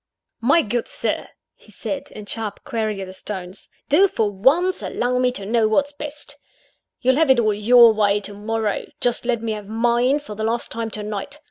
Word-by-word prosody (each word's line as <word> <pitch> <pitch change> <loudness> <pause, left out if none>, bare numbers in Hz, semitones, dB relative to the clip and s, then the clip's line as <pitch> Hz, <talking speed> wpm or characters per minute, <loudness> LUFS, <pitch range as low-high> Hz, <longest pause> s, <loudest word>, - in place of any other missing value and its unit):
"My 275 +8 +4
good 235 +3 -2
Sir!" - - -2 0.3
he - - -21
said, 280 - -5
in 210 - -10
sharp, 215 -1 -5
querulous 195 -4 -3
tones, 185 -2 -6 0.2
"do, 365 +8 +5
for 220 - 0
once, 300 - +2
allow 250 +1 -1
me 250 0 +3
to 200 -5 -7
know 225 +1 +2
what's 285 +7 +1
best. 290 0 -7 0.6
You'll 260 0 +3
have 320 -2 +3
it 260 -2 +6
all 215 -2 +2
your 230 +2 +6
way 205 -1 +2
to 205 - -8
morrow 215 0 -2
just 245 0 0
let 235 -2 0
me 225 - -1
have 210 -2 -5
mine, 240 +5 +2
for 290 -8 -8
the 215 +1 -5
last 230 +2 -1
time, 230 -1 -3
to 210 -1 -5
night. 210 +7 -5
230 Hz, 195 wpm, -22 LUFS, 210-255 Hz, 0.6 s, it